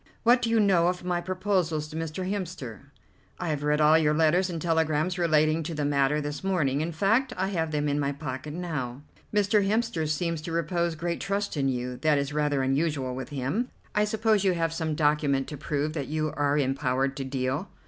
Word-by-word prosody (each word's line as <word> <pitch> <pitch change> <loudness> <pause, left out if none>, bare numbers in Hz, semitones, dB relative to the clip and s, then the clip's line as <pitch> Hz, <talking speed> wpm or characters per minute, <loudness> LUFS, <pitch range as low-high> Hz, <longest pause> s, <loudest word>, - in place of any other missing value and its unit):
What 240 +1 +5
do 230 - 0
you 230 0 +3
know 185 -5 +4
of 180 0 -1
my 175 -1 -1
proposals 180 -4 -1
to 155 - -9
Mr. 165 +3 -3
Hemster?" 180 - -5 0.5
"I 175 - -3
have 150 -2 -1
read 150 +1 +1
all 155 +1 +6
your 150 -1 +2
letters 165 +4 +3
and 170 -2 -4
telegrams 160 +1 +1
relating 155 -1 +3
to 160 +1 -4
the 150 -1 -1
matter 145 +1 +2
this 145 +2 -4
morning; 150 -8 +1
in 165 +2 -2
fact, 220 - +2
I 190 +1 0
have 165 -5 -1
them 150 -1 -1
in 145 0 0
my 140 -1 0
pocket 140 +1 -6
now." 145 -7 -4 0.3
"Mr. 205 0 +3
Hemster 205 -6 0
seems 165 +1 -1
to 165 - -6
repose 170 +1 0
great 170 +2 -3
trust 200 0 -2
in 135 -2 +1
you. 125 -1 -3
That 155 0 +2
is 140 0 -2
rather 145 -2 +1
unusual 135 -1 0
with 130 +2 -6
him. 145 - -2 0.2
I 210 0 +3
suppose 215 -1 +2
you 190 -2 +3
have 165 -1 -1
some 160 -2 -2
document 145 -3 +2
to 150 - -5
prove 150 +1 -2
that 145 -4 -3
you 155 0 -1
are 145 0 +1
empowered 135 -1 0
to 135 - -2
deal?" 135 +6 -2
155 Hz, 210 wpm, -27 LUFS, 145-180 Hz, 0.5 s, all